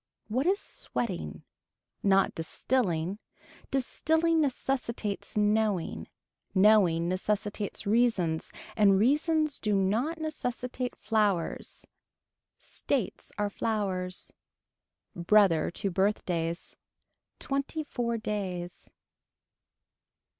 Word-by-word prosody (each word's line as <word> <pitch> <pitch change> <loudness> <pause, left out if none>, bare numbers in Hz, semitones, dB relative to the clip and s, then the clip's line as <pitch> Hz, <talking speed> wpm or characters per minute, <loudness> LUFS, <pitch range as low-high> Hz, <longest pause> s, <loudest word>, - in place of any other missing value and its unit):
What 255 +8 0
is 395 +2 +3
sweating. 180 - -4 0.6
Not 195 -1 +3
distilling. 180 +1 -1 0.5
Distilling 320 +5 +2
necessitates 245 -7 -2
knowing. 210 -4 +1 0.5
Knowing 190 -5 +5
necessitates 205 +2 -2
reasons 200 -7 +1 0.2
and 200 -3 +5
reasons 300 - +2
do 210 -1 +1
not 220 - +1
necessitate 250 -5 -4
flowers. 210 -5 -1 0.7
States 255 -10 -3
are 205 -1 0
flowers. 190 -5 -2 0.8
Brother 175 -1 +4
to 195 +3 -3
birthdays. 175 -3 -1 0.6
Twenty 275 +3 -2
four 235 -5 -2
days. 185 -5 -4
210 Hz, 75 wpm, -29 LUFS, 185-250 Hz, 0.8 s, Knowing